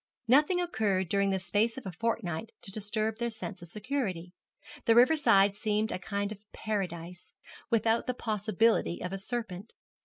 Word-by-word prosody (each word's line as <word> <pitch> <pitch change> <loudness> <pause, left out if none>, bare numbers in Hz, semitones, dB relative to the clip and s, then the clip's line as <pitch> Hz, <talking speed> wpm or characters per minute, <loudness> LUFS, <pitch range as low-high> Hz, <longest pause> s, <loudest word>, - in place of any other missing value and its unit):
Nothing 295 +9 +4
occurred 210 - 0
during 200 +1 +2
the 190 - +1
space 205 +6 0
of 265 - -8
a 190 - -4
fortnight 220 +1 -2
to 195 - -4
disturb 215 +2 -2
their 235 0 0
sense 220 -4 -6
of 175 - -10
security. 205 - -3 0.5
The 225 - +5
river 250 +7 +7
side 200 -10 +5
seemed 215 +1 0
a - - -3
kind 200 +2 -3
of 210 - -7
Paradise, 180 -5 -4 0.3
without 230 0 +2
the 250 - -1
possibility 215 -4 +1
of 180 +1 -4
a 195 - -3
serpent. 215 -2 -5
210 Hz, 165 wpm, -30 LUFS, 190-230 Hz, 0.5 s, river